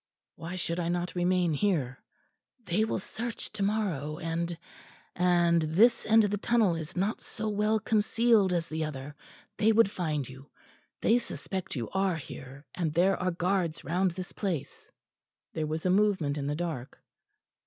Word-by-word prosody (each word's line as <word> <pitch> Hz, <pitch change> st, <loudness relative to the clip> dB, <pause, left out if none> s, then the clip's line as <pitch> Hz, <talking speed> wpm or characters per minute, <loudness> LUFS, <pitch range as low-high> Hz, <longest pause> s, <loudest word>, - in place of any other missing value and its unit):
"Why 170 Hz, +2 st, -7 dB
should 170 Hz, -1 st, -2 dB
I 170 Hz, -1 st, -1 dB
not 175 Hz, 0 st, -1 dB
remain 180 Hz, -1 st, +2 dB
here?" 145 Hz, -8 st, 0 dB, 0.6 s
"They 200 Hz, +4 st, +2 dB
will -, -, -1 dB
search 230 Hz, +4 st, -5 dB
to 215 Hz, -, -6 dB
morrow 190 Hz, -8 st, -1 dB
and 165 Hz, +1 st, -2 dB, 0.6 s
and 175 Hz, -2 st, +3 dB
this 200 Hz, +10 st, +3 dB
end 220 Hz, 0 st, +6 dB
of 205 Hz, -, +1 dB
the 205 Hz, -, -1 dB
tunnel 220 Hz, -5 st, +3 dB
is 165 Hz, +2 st, -6 dB
not 200 Hz, +5 st, 0 dB
so 220 Hz, -1 st, -5 dB
well 210 Hz, +1 st, +1 dB
concealed 220 Hz, -1 st, +3 dB
as 170 Hz, -2 st, 0 dB
the 160 Hz, 0 st, -2 dB
other. 145 Hz, -1 st, -6 dB, 0.4 s
They 220 Hz, +1 st, +4 dB
would 220 Hz, -2 st, +4 dB
find 155 Hz, -, -2 dB
you. 130 Hz, +2 st, -12 dB, 0.5 s
They 235 Hz, +2 st, +4 dB
suspect 190 Hz, -6 st, -5 dB
you 120 Hz, -4 st, -3 dB
are 190 Hz, -2 st, +1 dB
here, 135 Hz, -2 st, -9 dB
and 165 Hz, -4 st, -1 dB
there 190 Hz, +3 st, +4 dB
are 185 Hz, -, 0 dB
guards 175 Hz, -2 st, -1 dB
round 180 Hz, +6 st, +1 dB
this 180 Hz, +1 st, -7 dB
place." 180 Hz, -9 st, -4 dB, 0.6 s
There 155 Hz, -1 st, -2 dB
was 160 Hz, +2 st, -3 dB
a 180 Hz, -, +3 dB
movement 190 Hz, -7 st, +2 dB
in 140 Hz, -2 st, -3 dB
the 145 Hz, -, -1 dB
dark. 160 Hz, -7 st, -4 dB
180 Hz, 165 wpm, -29 LUFS, 160-205 Hz, 0.6 s, end